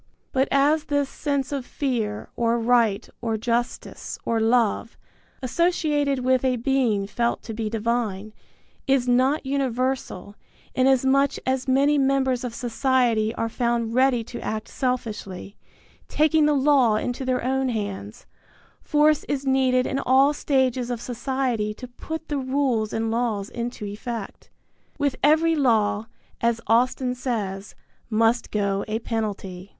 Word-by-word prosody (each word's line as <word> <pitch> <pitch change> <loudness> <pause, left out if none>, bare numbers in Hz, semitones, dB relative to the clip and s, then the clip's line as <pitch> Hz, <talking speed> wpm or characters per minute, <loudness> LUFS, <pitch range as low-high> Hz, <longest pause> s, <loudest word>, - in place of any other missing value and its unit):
But 265 +1 +2
as 295 +3 +3
this 285 -2 0
sense 280 -1 -2
of 280 -2 -2
fear 230 -6 -3
or 235 0 +1
right 230 -3 +2
or 225 -2 -1
justice 235 +2 -3
or 230 -1 +1
love, 230 0 +1 0.5
associated 290 -3 +1
with 260 0 +3
a 255 -1 +2
Being 240 -5 +1
felt 235 +4 -1
to 225 - -6
be 220 0 -3
divine, 215 -2 -2 0.5
is 270 -2 +2
not 260 +4 +2
universal, 260 -6 -2 0.4
inasmuch 265 +1 +3
as 260 0 -1
many 280 +3 +3
members 265 -2 +1
of 240 -2 -5
society 240 -2 +1
are 230 - -1
found 235 -1 -1
ready 255 -2 +3
to 240 - -8
act 215 0 -4
selfishly, 215 -6 -4 0.5
taking 310 0 +3
the 300 - +3
law 270 -5 +4
into 245 +4 -2
their 255 -1 -1
own 265 +1 0
hands, 205 0 -5 0.6
force 300 0 +3
is 280 -1 -3
needed 260 -1 +2
in 270 - -1
all 270 +3 +4
stages 260 -4 0
of 240 -2 -2
society 245 -3 -2
to 250 - -9
put 320 +6 -7
the 290 -2 -2
rules 260 -5 0
and 225 0 -1
laws 225 -4 -1
into 235 -2 -5
effect. 215 +1 -6 0.5
With 285 -3 0
every 315 +3 +4
law, 225 -6 +2 0.3
as 235 0 +1
Austin 250 +3 +2
says, 210 -6 -4 0.3
must 225 +1 +2
go 200 -1 0
a 215 0 -1
penalty. 205 -5 -4
245 Hz, 135 wpm, -24 LUFS, 225-270 Hz, 0.6 s, law